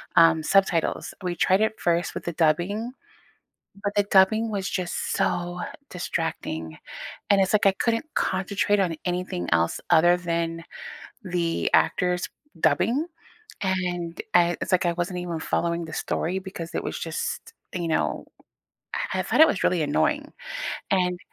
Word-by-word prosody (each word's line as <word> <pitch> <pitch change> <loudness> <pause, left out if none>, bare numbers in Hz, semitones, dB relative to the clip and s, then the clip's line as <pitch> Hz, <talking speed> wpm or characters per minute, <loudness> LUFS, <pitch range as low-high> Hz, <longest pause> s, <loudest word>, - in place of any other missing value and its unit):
um, 165 -1 +6
subtitles. 190 -2 +2
We 175 -1 -1
tried 190 +4 +3
it 220 0 0
first 170 0 +1
with - - -5
the 170 - -2
dubbing, 175 +9 +1 0.9
but 205 - -1
the 205 - +4
dubbing 205 +3 +4
was 200 -2 -2
just 180 -2 -2
so 175 0 -1 0.3
distracting. 160 - -3 0.5
And 200 -1 +6
it's 190 - +2
like 210 -1 +3
I 195 - +7
couldn't 230 +7 0
concentrate 200 +2 +1
on 170 -4 0
anything 180 - -2
else 85 0 +2
other 175 +2 +6
than 165 -1 -2 0.6
the 175 -3 0
actors 180 0 +2 0.3
dubbing, 220 - +2 0.6
and, 180 -3 -1
eh 175 0 +5
it's - - -3
like 180 -1 +3
I 170 - +2
wasn't 180 +1 -3
even 170 -2 -4
following 170 +1 -1
the - - -9
story 180 +4 -1
because 175 -3 -7
it - - -2
was - - -3
just, 165 -1 -4 0.2
you 170 -2 -2
know, 160 - 0 0.9
I - - 0
I - - +1
thought - - +3
it 320 - +10
was 195 - -1
really 175 -3 +2
annoying, 145 0 0 0.6
and 180 -2 +2
175 Hz, 150 wpm, -25 LUFS, 165-190 Hz, 0.9 s, it